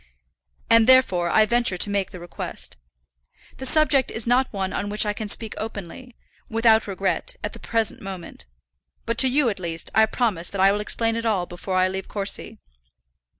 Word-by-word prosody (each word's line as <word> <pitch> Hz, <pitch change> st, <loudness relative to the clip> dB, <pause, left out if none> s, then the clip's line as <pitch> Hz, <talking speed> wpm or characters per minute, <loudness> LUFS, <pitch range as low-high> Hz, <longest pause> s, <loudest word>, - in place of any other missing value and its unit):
"And 230 Hz, 0 st, +5 dB
therefore 190 Hz, -10 st, +4 dB
I 215 Hz, -, +4 dB
venture 235 Hz, -4 st, +1 dB
to 205 Hz, -, +1 dB
make 200 Hz, -1 st, -1 dB
the 180 Hz, -, -10 dB
request. 175 Hz, 0 st, -6 dB, 0.8 s
The 265 Hz, -, -4 dB
subject 290 Hz, -3 st, +3 dB
is 225 Hz, -, -2 dB
not 250 Hz, +2 st, +2 dB
one 190 Hz, -2 st, -3 dB
on 205 Hz, -, -3 dB
which 210 Hz, +1 st, +2 dB
I 210 Hz, -, 0 dB
can 215 Hz, +1 st, -5 dB
speak 220 Hz, +1 st, 0 dB
openly, 220 Hz, +3 st, -7 dB, 0.3 s
without 225 Hz, -1 st, +3 dB
regret, 195 Hz, -, -2 dB
at -, -, -3 dB
the -, -, -9 dB
present 225 Hz, -2 st, -2 dB
moment. 190 Hz, -, -8 dB, 0.6 s
But 230 Hz, 0 st, -2 dB
to 265 Hz, -, +6 dB
you, 270 Hz, +1 st, +2 dB
at 200 Hz, -, -4 dB
least, 165 Hz, -2 st, -4 dB
I 220 Hz, +1 st, +5 dB
promise 210 Hz, -9 st, -1 dB
that 200 Hz, -, -6 dB
I 195 Hz, +1 st, +6 dB
will 205 Hz, +1 st, -1 dB
explain 225 Hz, +1 st, -1 dB
it 230 Hz, 0 st, -3 dB
all 195 Hz, -5 st, +1 dB
before 175 Hz, +2 st, -5 dB
I 185 Hz, 0 st, +3 dB
leave 190 Hz, 0 st, -5 dB
Courcy." 200 Hz, -1 st, -1 dB
215 Hz, 190 wpm, -23 LUFS, 190-230 Hz, 0.8 s, to